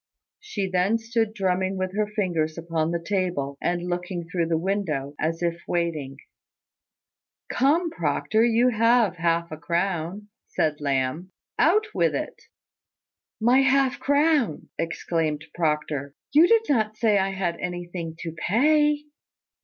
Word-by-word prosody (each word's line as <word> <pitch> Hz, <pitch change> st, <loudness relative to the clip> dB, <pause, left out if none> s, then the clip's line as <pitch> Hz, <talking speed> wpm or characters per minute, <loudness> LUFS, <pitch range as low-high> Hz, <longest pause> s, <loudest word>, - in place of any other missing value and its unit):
She 220 Hz, -, -3 dB
then 185 Hz, +4 st, +2 dB
stood 225 Hz, -1 st, -1 dB
drumming 190 Hz, -2 st, -1 dB
with 185 Hz, 0 st, -3 dB
her 210 Hz, 0 st, +1 dB
fingers 175 Hz, -7 st, -1 dB
upon 165 Hz, -1 st, -1 dB
the 170 Hz, 0 st, -1 dB
table, 175 Hz, -6 st, -2 dB
and 175 Hz, 0 st, -1 dB
looking 175 Hz, -1 st, -3 dB
through 170 Hz, -1 st, -1 dB
the 165 Hz, -1 st, +1 dB
window, 165 Hz, -7 st, -2 dB
as 165 Hz, +2 st, -1 dB
if 170 Hz, 0 st, -1 dB
waiting. 155 Hz, -6 st, -2 dB, 1.3 s
"Come, 320 Hz, +6 st, +2 dB
Proctor, 155 Hz, -, +1 dB
you 235 Hz, +1 st, +4 dB
have 230 Hz, -4 st, +3 dB
half 170 Hz, 0 st, 0 dB
a 155 Hz, -, -5 dB
crown," 175 Hz, +5 st, -2 dB, 0.2 s
said 150 Hz, -1 st, -1 dB
Lamb. 140 Hz, +6 st, -1 dB, 0.3 s
"Out 420 Hz, +7 st, +4 dB
with -, -, +1 dB
it!" -, -, -5 dB, 0.9 s
"My 240 Hz, +4 st, +4 dB
half 270 Hz, 0 st, +2 dB
crown!" 285 Hz, -, +1 dB
exclaimed 165 Hz, -2 st, -2 dB
Proctor. 150 Hz, -3 st, -1 dB, 0.2 s
"You 315 Hz, +4 st, +7 dB
did 455 Hz, +2 st, +4 dB
not 215 Hz, -5 st, +1 dB
say 215 Hz, -3 st, +3 dB
I 195 Hz, 0 st, +1 dB
had 185 Hz, -3 st, -2 dB
anything 175 Hz, -2 st, -5 dB
to 165 Hz, -, -4 dB
pay." 295 Hz, -, +2 dB
180 Hz, 135 wpm, -25 LUFS, 165-225 Hz, 1.3 s, You